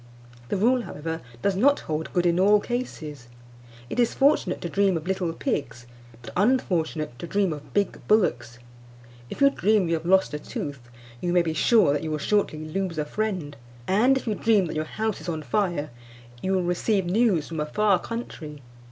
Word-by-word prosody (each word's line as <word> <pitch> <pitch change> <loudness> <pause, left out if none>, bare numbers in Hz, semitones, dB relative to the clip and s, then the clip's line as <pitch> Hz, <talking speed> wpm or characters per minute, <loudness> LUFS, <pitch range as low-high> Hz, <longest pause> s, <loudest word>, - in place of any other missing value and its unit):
The - - 0
rule, 245 +6 +3
however, 160 -5 -5 0.2
does 200 -1 +2
not 280 +9 +3
hold 155 0 -4
good 175 0 +1
in 175 0 +3
all 205 +2 +5
cases. 155 - -5 0.6
It 245 - -4
is 240 - +2
fortunate 275 -9 +2
to - - -3
dream 195 +1 +2
of 160 - -7
little 190 -2 -1
pigs, 140 - -3 0.4
but - - -9
unfortunate 170 - 0
to 170 - -6
dream 195 -2 +1
of 145 -2 -10
big 200 - 0
bullocks. 125 - +1 0.7
If - - -8
you 275 0 +6
dream 210 -6 +2
you 165 - 0
have 165 0 -2
lost 190 -3 +3
a 150 - -3
tooth, 145 -3 -6 0.4
you 175 - -1
may 175 -1 +4
be 160 -1 -2
sure 185 - +4
that 145 - -1
you 160 - -4
will 155 - -1
shortly 155 -2 0
lose 185 0 -3
a 150 - -1
friend; 185 -5 -3 0.3
and 240 +8 +4
if - - -5
you 220 - 0
dream 210 -2 +2
that 160 - -5
your 155 0 -1
house 220 +5 -3
is - - -6
on 160 -2 -3
fire, 170 - -1 0.5
you 190 - 0
will 185 -1 +1
receive 180 +3 0
news 190 -4 +2
from 165 -2 -5
a 150 - 0
far 200 +3 +2
country. 160 - -7
180 Hz, 195 wpm, -25 LUFS, 155-210 Hz, 0.7 s, you